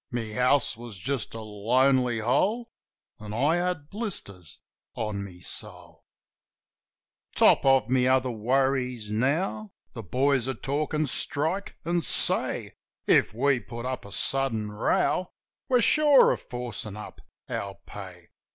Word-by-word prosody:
My 115 -3 -4
house 125 0 +2
was 115 -3 -10
just 130 +3 -3
a 115 - -5
lonely 120 +4 +2
hole. 215 - +1 0.5
An' 105 0 -7
I 145 +8 +2
had 175 -4 -2
blisters 100 - -6 0.4
on 105 -3 -3
my 90 -3 -11
soul. - - -11 1.3
Top - - +5
of 135 0 +4
my 125 0 +2
other 130 -1 +2
worries 125 -1 0
now 165 - -1 0.2
The 115 - -6
boys 130 +5 +1
are 135 - -2
talkin' 150 +5 -1
strike, 160 +8 -1
an' 170 +1 +1
say - - +1 0.3
If - - +4
we 135 +1 +2
put 120 +2 -8
up 130 -1 -3
a 100 - -12
sudden 115 -6 +1
row 180 - 0 0.4
We're 250 -2 +4
sure 295 +1 +5
of - - -2
forcin' 120 -4 -5
up 105 - -10 0.3
our 100 -1 -4
pay. 95 -4 -10
125 Hz, 135 wpm, -27 LUFS, 110-145 Hz, 1.3 s, Top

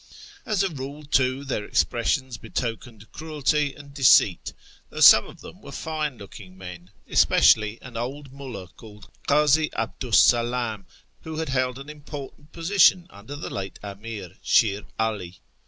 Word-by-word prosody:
As 210 -3 +1
a 195 - 0
rule, 145 0 -8
too, 135 -1 +1
their 130 -6 -3
expressions 120 +3 0
betokened 115 0 -6
cruelty 150 -2 -1
and 145 -1 -14
deceit, 130 - +4 0.4
though - - -8
some - - +8
of - - -14
them - - -12
were - - -11
fine 155 -4 -4
looking 95 -2 -12
men, 90 -1 -10 0.2
especially 110 +1 +4
an 125 -2 -11
old 135 +4 -5
rmdld 130 -10 -9
called 105 -2 -14 0.2
Kazi 150 +1 +3
'Abdu 125 -3 -4
's - - +7
TEHERAN 120 -1 +2
113 - - -5 0.3
Salam, - - -26 0.4
who 160 -1 -7
had 160 -2 -3
held 130 -1 -1
an 135 +1 -10
important 150 0 -10
position 175 +1 +3
under 105 +8 -10
the 145 - -7
late 95 0 -6
Amir, 100 -2 -8
Shir 105 -1 +2
'Ali. 100 -6 -3
130 Hz, 155 wpm, -24 LUFS, 105-145 Hz, 0.4 s, some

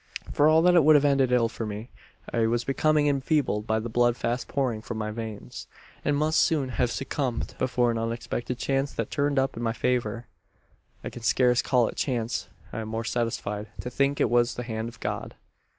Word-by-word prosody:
"For 145 - +4
all 160 +1 +5
that 180 0 +5
it 170 -3 +6
would 155 +1 +7
have 145 0 +5
ended 135 -3 +3
ill 120 -2 +4
for 115 - -6
me. 105 +2 -6 0.4
I 115 -1 +2
was 120 +1 0
becoming 150 +3 +2
enfeebled 140 -6 +1
by 110 - +2
the 110 +1 -3
blood 120 +1 +2
fast 120 +2 -2
pouring 125 -6 -1
from 115 0 -6
my 110 0 -3
veins, 110 - -7 0.4
and 145 -1 +1
must 155 +2 +2
soon 145 -5 +2
have 125 -1 0
succumbed, 130 -1 -3
but 130 - +1
for 120 -1 +2
an 115 - -2
unexpected 115 +2 -3
chance 135 +2 0
that - - -3
turned 145 -1 0
up 135 0 +1
in 115 - -5
my 115 -1 0
favour. 120 -1 -1 0.8
"I - - -5
can 120 - -9
scarce 125 +1 +3
call 125 -3 +2
it - - -7
chance. 120 -4 -2 0.2
I - - -3
am 110 - -5
more 115 +1 -3
satisfied, 110 -3 -2
to 125 - -6
think 140 +2 +1
it - - +2
was 120 0 +3
the 125 - -4
hand 110 -1 -4
of - - -15
God." - - -4
120 Hz, 215 wpm, -26 LUFS, 115-135 Hz, 0.8 s, would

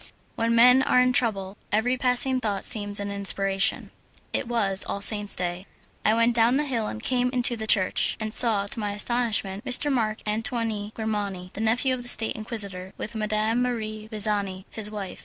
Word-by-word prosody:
When 230 0 0
men 250 +3 +6
are 250 - +3
in 250 0 +3
trouble, 200 -5 -1
every 220 +4 +1
passing 255 +1 +2
thought 205 -4 -2
seems 205 -2 +3
an 200 0 -4
inspiration. 195 0 0 0.4
It - - -1
was 200 -5 0
All 200 - -4
Souls' 205 0 0
Day. 180 +1 -4 0.4
I 215 - +3
went 230 +1 +2
down 235 +3 +4
the 300 - 0
hill, 235 -6 -2
and 110 - -7
came 250 -1 +1
into 245 -1 +1
the 220 -1 -6
church, 190 -4 +3
and 215 -1 -4
saw, 215 -5 +4
to 205 - -1
my 205 -1 -3
astonishment, 210 -3 -1
M. 275 +2 +2
Marc 220 -4 -1
Antoine 220 -1 -3
Grimani, 205 -5 -4
the 215 - -6
nephew 245 +4 +1
of 255 - -4
the 245 - -1
State 225 -2 +2
Inquisitor, 200 -4 -3
with 215 - -6
Madame 215 +2 -1
Marie 215 -3 -4
Visani, 200 -3 -1
his 215 -2 -3
wife. 205 -3 -7
215 Hz, 185 wpm, -25 LUFS, 200-240 Hz, 0.4 s, men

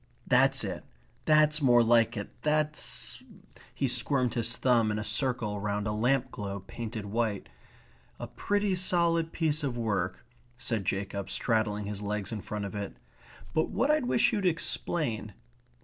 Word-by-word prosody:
That's - - +4
it. - - -4 0.4
That's 155 0 +4
more 120 -3 +5
like 115 0 +3
it. 100 - -5
That's 150 0 0 0.3
..." - - -23
he 135 - 0
squirmed 125 0 +1
his 115 0 0
thumb 120 -4 +3
in 105 - -1
a 105 - -2
circle 110 -2 -1
round 105 0 -2
a 105 - -1
lamp 125 +4 +1
globe 100 -2 -6
painted 115 -2 -6
white. 105 - -2 0.7
"A - - -4
pretty 205 -1 -1
solid 170 -2 +2
piece 155 -2 0
of 135 -4 -2
work," 100 -6 -2 0.3
said 115 -5 -1
Jacob, 100 0 -2
straddling 105 -3 0
his 105 0 -5
legs 105 0 -3
in 110 -3 -4
front 105 0 -4
of 100 - -6
it. 100 -1 -5 0.6
"But 160 - +1
what 275 +4 +1
I 305 - +4
wish 250 -3 +2
you'd 205 -2 0
explain 165 - 0
120 Hz, 160 wpm, -29 LUFS, 105-150 Hz, 0.7 s, more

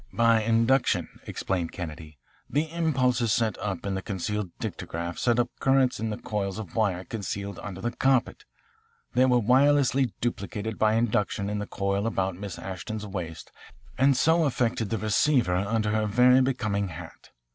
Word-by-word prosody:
"By 115 -1 +3
induction," 115 +4 +1
explained 90 -4 -2
Kennedy. 80 -3 -7 0.3
"The 150 +4 0
impulses 130 -9 +1
set 110 0 +1
up 100 -3 -4
in 100 - -1
the 95 - -2
concealed 100 +1 -3
dictograph 85 +1 -5
set 120 -1 +2
up 120 0 +1
currents 135 -1 +2
in 110 0 -2
these 105 - -5
coils 100 -2 -2
of 110 -6 -8
wire 100 -5 +1
concealed 100 -2 -5
under 95 -2 -7
the 120 - -1
carpet. 130 +1 +1 0.7
They 130 - +4
were 125 -1 +4
wirelessly 130 +1 +3
duplicated 110 -2 -3
by 110 0 +3
induction 105 -3 0
in 105 - -2
the 105 - -4
coil 100 +2 -1
about 95 -4 -1
Miss 100 0 -7
Ashton's 95 +3 -6
waist 90 -6 -6 0.4
and 135 -1 +3
so 160 +3 +3
affected 120 -5 0
the 115 - -1
receiver 110 - +2
under 105 +3 0
her 110 0 +1
very 125 +4 +5
becoming 105 -6 0
hat. 85 -1 -10
110 Hz, 160 wpm, -27 LUFS, 100-125 Hz, 0.7 s, very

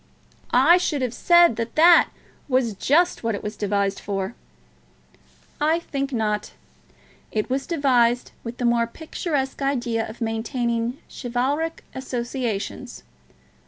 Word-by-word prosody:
"I 280 +8 +6
should 295 -6 -1
have 250 -2 -2
said 345 -4 +5
that 230 0 -4
that 335 +2 +7 0.4
was 255 -4 +1
just 320 - +2
what 230 -2 0
it - - -7
was 210 +1 -4
devised 200 -1 -1
for." 195 +1 -3 1.3
"I 315 +2 +3
think 280 -5 -4
not. 210 -3 -1 0.8
It 215 +3 -2
was 270 +1 -1
devised 250 -7 +2
with 230 0 -7
the 245 - -2
more 235 0 +2
picturesque 290 0 -3
idea 240 -5 -1
of 220 - -10
maintaining 235 +1 -2
chivalric 275 +6 -2
associations. 245 -4 -4
245 Hz, 125 wpm, -23 LUFS, 225-280 Hz, 1.3 s, that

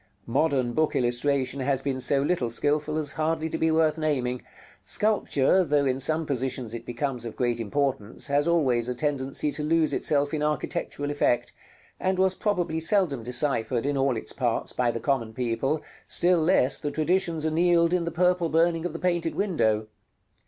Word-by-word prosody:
Modern 130 -1 0
book 155 +2 0
illustration 130 +2 0
has 135 0 0
been 135 -2 -2
so 135 +2 +1
little 145 -6 0
skilful 150 +6 0
as 150 -2 -1
hardly 160 0 -1
to - - -3
be 160 - +2
worth 160 -1 +2
naming. 130 -5 -1 0.4
Sculpture, 190 -5 +2
though 145 -3 +1
in 130 0 0
some 155 +4 0
positions 130 -4 -2
it 115 0 -7
becomes 125 0 -3
of 115 - -7
great 120 -1 -1
importance, 130 -1 -2
has 145 +1 +1
always 130 -8 +2
a 125 - -2
tendency 140 +1 -1
to 150 - -3
lose 160 0 +2
itself 145 0 +1
in 155 - -1
architectural 150 -1 -2
effect; 120 -4 0 0.5
and 185 0 0
was 190 0 +3
probably 180 -5 -1
seldom 165 - +2
deciphered, 125 0 0
in 145 0 0
all 135 -3 +1
its - - -5
parts, 120 -4 -1
by 125 -1 +1
the 115 - -2
common 115 -4 -1
people, 125 +5 -1 0.2
still 175 0 +3
less 155 -5 +3
the 145 - -3
traditions 165 +1 0
annealed 170 +1 +3
in 180 -1 +1
the 170 - -2
purple 175 0 +1
burning 165 +1 +2
of - - -9
the - - -4
painted 175 -2 -1
window. 110 - +1
145 Hz, 175 wpm, -26 LUFS, 125-165 Hz, 0.5 s, was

